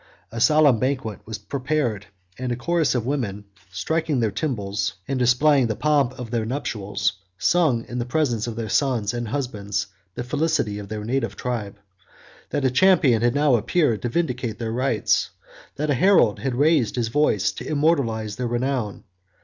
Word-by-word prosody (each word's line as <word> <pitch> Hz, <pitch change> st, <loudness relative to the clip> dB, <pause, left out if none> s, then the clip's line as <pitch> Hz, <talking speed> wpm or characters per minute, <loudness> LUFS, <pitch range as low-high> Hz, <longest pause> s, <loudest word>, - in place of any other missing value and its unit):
A 115 Hz, 0 st, -4 dB
solemn 150 Hz, -4 st, +5 dB
banquet 130 Hz, -5 st, -2 dB
was 110 Hz, -1 st, -4 dB
prepared, 125 Hz, -2 st, -2 dB, 0.3 s
and 125 Hz, -1 st, -4 dB
a -, -, 0 dB
chorus 160 Hz, +4 st, +1 dB
of 120 Hz, -2 st, -1 dB
women, 110 Hz, -7 st, -2 dB, 0.3 s
striking 160 Hz, -, -1 dB
their 110 Hz, -3 st, +1 dB
tymbals, 100 Hz, -9 st, -2 dB
and 135 Hz, -1 st, -1 dB
displaying 125 Hz, +2 st, +4 dB
the 110 Hz, -, -2 dB
pomp 140 Hz, -3 st, +1 dB
of 125 Hz, -3 st, -7 dB
their 115 Hz, -2 st, 0 dB
nuptials, 105 Hz, -5 st, -2 dB, 0.2 s
sung 150 Hz, -, +2 dB
in 125 Hz, -, -4 dB
the 120 Hz, -, -2 dB
presence 120 Hz, -5 st, 0 dB
of 115 Hz, -, -4 dB
their 115 Hz, -1 st, -4 dB
sons 120 Hz, -3 st, +1 dB
and 120 Hz, -1 st, -3 dB
husbands 105 Hz, -6 st, -2 dB, 0.3 s
the -, -, -3 dB
felicity 140 Hz, -6 st, 0 dB
of 100 Hz, -1 st, -9 dB
their 105 Hz, -1 st, -4 dB
native 125 Hz, 0 st, -1 dB
tribe; 115 Hz, -6 st, -4 dB, 0.7 s
that 140 Hz, -, -1 dB
a 130 Hz, -, +3 dB
champion 145 Hz, -, +4 dB
had 120 Hz, +2 st, +2 dB
now 145 Hz, -1 st, +3 dB
appeared 120 Hz, 0 st, +2 dB
to 120 Hz, -, -2 dB
vindicate 125 Hz, -7 st, -2 dB
their 115 Hz, 0 st, -3 dB
rights; 125 Hz, -2 st, +1 dB, 0.5 s
that 150 Hz, +1 st, -1 dB
a -, -, +4 dB
herald 140 Hz, -, +4 dB
had 135 Hz, -3 st, -2 dB
raised 145 Hz, -4 st, +3 dB
his 120 Hz, -3 st, -1 dB
voice 115 Hz, -7 st, +2 dB
to -, -, -8 dB
immortalize 130 Hz, -9 st, 0 dB
their 125 Hz, -1 st, -2 dB
renown. 120 Hz, -3 st, -2 dB
125 Hz, 175 wpm, -23 LUFS, 110-145 Hz, 0.7 s, solemn